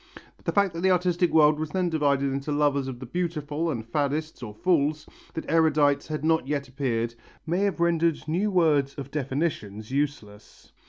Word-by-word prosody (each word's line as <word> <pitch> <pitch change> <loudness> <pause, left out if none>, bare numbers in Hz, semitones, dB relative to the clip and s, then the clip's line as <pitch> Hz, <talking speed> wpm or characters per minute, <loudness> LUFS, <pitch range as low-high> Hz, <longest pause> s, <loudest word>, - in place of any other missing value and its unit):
The - - +1
fact 200 -3 +2
that 165 - -5
the 190 - +3
artistic 180 -1 +2
world 150 -1 +5
was 155 -1 -3
then 180 +2 0
divided 140 -4 +1
into 140 +2 -3
lovers 145 -2 +1
of 125 -2 -6
the 130 - -7
beautiful 160 +1 -2
and 115 -7 -3
faddists 145 +5 -2
or 115 -4 -6
fools, 150 - +1 0.3
that 160 - -4
erudites 155 -3 +3
had 155 -1 -3
not 160 -4 +2
yet 140 -1 -2
appeared, 120 -3 -2 0.3
may 170 +3 0
have 200 -3 0
rendered 170 -2 +1
new 180 +7 0
words 150 -7 +2
of 140 -1 -7
definitions 130 -7 -3
useless. 135 -8 -4
150 Hz, 175 wpm, -26 LUFS, 140-165 Hz, 0.3 s, world